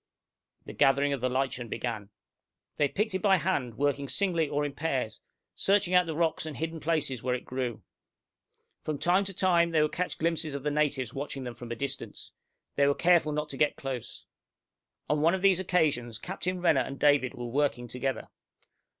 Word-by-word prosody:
The -, -, -8 dB
gathering 140 Hz, +1 st, +3 dB
of 135 Hz, -, -3 dB
the 130 Hz, -, +1 dB
lichen 130 Hz, -1 st, -1 dB
began. 110 Hz, -5 st, -4 dB, 0.7 s
They 145 Hz, -, +3 dB
picked 210 Hz, +7 st, -1 dB
it 190 Hz, -, -1 dB
by 195 Hz, -2 st, +5 dB
hand, 145 Hz, -10 st, -1 dB
working 140 Hz, -1 st, 0 dB
singly 170 Hz, -6 st, +1 dB
or 145 Hz, 0 st, 0 dB
in 145 Hz, -, -4 dB
pairs, 130 Hz, -8 st, -2 dB, 0.3 s
searching 195 Hz, -2 st, +2 dB
out 180 Hz, -1 st, +5 dB
the 160 Hz, -, -3 dB
rocks 165 Hz, -1 st, +1 dB
and 155 Hz, -, -6 dB
hidden 165 Hz, +1 st, -3 dB
places 150 Hz, -6 st, -1 dB
where 125 Hz, 0 st, 0 dB
it 125 Hz, -, -7 dB
grew. 125 Hz, -3 st, -4 dB, 1.0 s
From 155 Hz, -2 st, -2 dB
time 180 Hz, +6 st, +2 dB
to 195 Hz, -, -5 dB
time 175 Hz, -3 st, +3 dB
they 165 Hz, -2 st, +2 dB
would 150 Hz, -, 0 dB
catch 180 Hz, +1 st, -2 dB
glimpses 160 Hz, -2 st, -1 dB
of 140 Hz, -, -5 dB
the 150 Hz, -, 0 dB
natives 145 Hz, -5 st, 0 dB
watching 135 Hz, -1 st, -5 dB
them 125 Hz, -1 st, -5 dB
from 120 Hz, 0 st, -9 dB
a -, -, -2 dB
distance. 140 Hz, +2 st, -5 dB, 0.5 s
They 140 Hz, 0 st, +4 dB
were 140 Hz, -, +3 dB
careful 170 Hz, -3 st, +4 dB
not 150 Hz, 0 st, -2 dB
to 135 Hz, -, -7 dB
get 150 Hz, 0 st, +2 dB
close. 130 Hz, -4 st, -6 dB, 0.8 s
On 150 Hz, 0 st, +1 dB
one 165 Hz, +4 st, +4 dB
of 190 Hz, -, -5 dB
these 195 Hz, -2 st, +5 dB
occasions, 150 Hz, -, +1 dB
Captain 180 Hz, -, -4 dB
Renner 160 Hz, -6 st, +4 dB
and 135 Hz, +2 st, -5 dB
David 145 Hz, -3 st, +3 dB
were 120 Hz, -, -6 dB
working 120 Hz, -1 st, 0 dB
together. 125 Hz, +3 st, -3 dB
145 Hz, 195 wpm, -29 LUFS, 130-170 Hz, 1.0 s, by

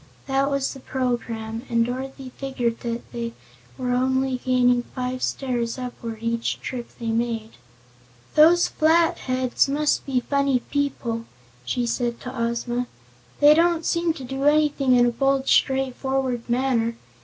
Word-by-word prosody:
That 275 Hz, +1 st, +1 dB
was 275 Hz, -1 st, -1 dB
the 270 Hz, -, -10 dB
program, 235 Hz, -3 st, -3 dB
and 230 Hz, -1 st, +2 dB
Dorothy 260 Hz, +1 st, -5 dB
figured 245 Hz, -4 st, -2 dB
that 235 Hz, 0 st, -5 dB
they 235 Hz, -1 st, -4 dB, 0.4 s
were 250 Hz, -1 st, -2 dB
only 260 Hz, +1 st, +1 dB
gaining 250 Hz, -1 st, +3 dB
five 255 Hz, 0 st, -3 dB
stairs 240 Hz, -3 st, -1 dB
upward 240 Hz, -3 st, -6 dB
each 230 Hz, 0 st, -1 dB
trip 245 Hz, -2 st, -5 dB
that -, -, -26 dB
they 230 Hz, -1 st, -2 dB
made. 225 Hz, -1 st, -1 dB, 0.8 s
"Those 335 Hz, +3 st, +6 dB
Flatheads 295 Hz, -6 st, +2 dB
must 295 Hz, +1 st, +1 dB
be 260 Hz, -2 st, +1 dB
funny 280 Hz, -1 st, +1 dB
people," 245 Hz, -5 st, -1 dB, 0.4 s
she 240 Hz, -, -1 dB
said 235 Hz, 0 st, -1 dB
to 250 Hz, +1 st, -7 dB
Ozma. 235 Hz, +1 st, -1 dB, 0.5 s
"They 295 Hz, +1 st, +9 dB
don't 335 Hz, 0 st, +2 dB
seem 335 Hz, -1 st, +1 dB
to 270 Hz, -, -9 dB
do 270 Hz, +2 st, -3 dB
anything 295 Hz, -3 st, +3 dB
in 245 Hz, 0 st, +5 dB
a 240 Hz, -, +2 dB
bold 270 Hz, +2 st, +1 dB
straightforward 265 Hz, -2 st, +1 dB
manner. 240 Hz, -2 st, +1 dB
255 Hz, 145 wpm, -24 LUFS, 235-275 Hz, 0.8 s, They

